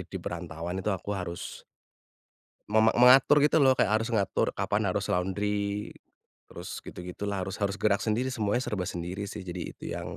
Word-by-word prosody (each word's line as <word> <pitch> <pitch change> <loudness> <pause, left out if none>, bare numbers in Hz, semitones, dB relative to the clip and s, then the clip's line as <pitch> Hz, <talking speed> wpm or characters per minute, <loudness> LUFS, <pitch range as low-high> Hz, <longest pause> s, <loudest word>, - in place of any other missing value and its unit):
di - - -6
perantauan 85 +3 -5
itu 105 - 0
aku 100 +2 -4
harus 85 -2 -6 1.1
mema 110 +1 +4
mengatur 135 +4 +7
gitu 150 +2 +4
loh, 135 -3 +5
kayak - - +2
harus 115 - -3
mengatur 100 -2 +1
kapan - - 0
harus - - -1
laundry, 100 +2 -1 0.6
terus - - -7
gitu-gitulah 95 +2 -5
harus 95 +2 -6
harus 100 0 0
gerak 105 0 +2
sendiri 120 +4 0
semuanya 115 +2 0
serba 100 -3 -2
sendiri 90 +4 -5
sih, 100 -2 -7
jadi 90 0 -5
itu - - -18
yang - - -5
100 Hz, 165 wpm, -28 LUFS, 95-110 Hz, 1.1 s, mengatur